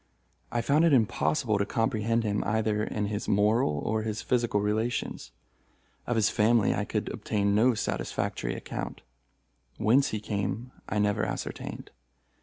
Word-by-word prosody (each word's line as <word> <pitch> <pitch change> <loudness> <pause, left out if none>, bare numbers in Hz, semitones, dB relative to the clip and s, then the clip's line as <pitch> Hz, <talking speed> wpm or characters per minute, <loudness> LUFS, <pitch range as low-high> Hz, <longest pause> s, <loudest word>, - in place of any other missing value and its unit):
I 120 - 0
found 145 +7 +3
it 165 -3 +5
impossible 105 - +2
to 100 - +1
comprehend 115 0 0
him 105 -1 0
either 105 0 0
in 105 -1 -2
his 105 +1 -3
moral 105 - +2
or 110 0 0
his 110 -1 -3
physical 120 -4 +1
relations. 110 - -1 0.8
Of 120 - 0
his 110 -2 +3
family 110 0 +3
I - - -1
could - - -2
obtain 100 -1 0
no 115 +4 +4
satisfactory - - -2
account. - - -6 0.8
Whence 130 +6 +4
he 110 - -2
came, 105 +3 -3 0.2
I - - -1
never 105 0 +1
ascertained. - - -5
110 Hz, 145 wpm, -28 LUFS, 105-115 Hz, 0.8 s, it